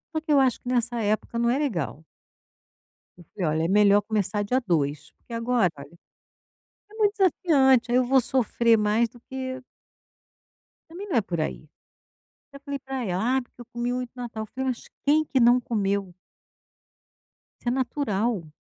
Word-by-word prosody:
Só 315 - 0
que 315 - -3
eu 285 - +6
acho 260 -3 +2
que 245 - -6
nessa 240 -1 0
época 215 +2 -1
não 235 0 +2
é 250 - +2
legal. 165 - -3 1.1
Eu 175 - -16
falei: 185 - -2
"Olha, 155 +1 0
é - - 0
melhor 205 +1 +5
começar 205 -1 -1
dia 250 +6 +1
2, 150 -4 -1
porque - - -17
agora, 230 -5 +1
olha, 145 +5 -12 0.9
é - - -16
muito 420 -2 +2
desafiante, 275 - +3
eu 255 +1 +4
vou 265 +1 +4
sofrer 235 -2 +2
mais 215 +2 +2
do 240 +1 -18
que" 260 0 -6 1.3
Também 370 +5 -8
não 355 - -1
é 230 - +5
por 175 -5 -4
aí. 155 0 -4 0.9
Até 280 0 -12
falei 280 -1 -4
pra 265 -2 -5
ela: 215 +8 0
"Ah, - - +1
porque 245 0 -16
eu - - -10
comi 240 +1 -2
muito 250 -1 -4
no 250 - -6
Natal." 220 -2 -5
Falei 265 +4 -4
"Mas 245 - -4 0.2
quem 300 +2 +4
que 270 - 0
não 240 +1 +6
comeu?" 200 -5 -1 1.5
Isso - - -4
é - - +3
natural. 240 - -1
240 Hz, 175 wpm, -25 LUFS, 205-265 Hz, 1.5 s, eu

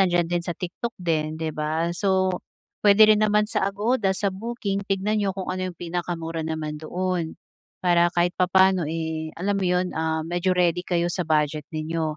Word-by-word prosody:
nandiyan 175 -3 +3
din 175 - +2
sa 175 - -4
TikTok 210 +6 -5
din, 155 -3 -1
'di 160 -1 -3
ba? 155 +3 -1
So, 190 0 +1 0.4
puwede 210 +1 +7
rin 215 0 +5
naman 210 0 +3
sa 195 - +1
Agoda, 205 0 0
sa 200 +1 0
booking, 200 -1 -3
tignan 200 +2 0
niyo 200 -2 0
kung 190 -1 -4
ano 185 0 -2
yung 175 - -9
pinakamura 165 -1 -3
naman 155 -1 -3
doon. 175 +1 -2 0.5
Para 175 -1 +4
kahit 175 0 +2
papaano, 185 -1 +4
eh, 160 0 -3
alam 200 +3 0
mo 195 - -1
'yon, 180 0 +1
ah, 160 0 0
medyo 175 +2 0
ready 175 -1 +2
kayo 175 -1 +1
sa 180 -4 -2
budget 150 -1 +1
ninyo. 155 0 -2
175 Hz, 185 wpm, -24 LUFS, 160-190 Hz, 0.5 s, puwede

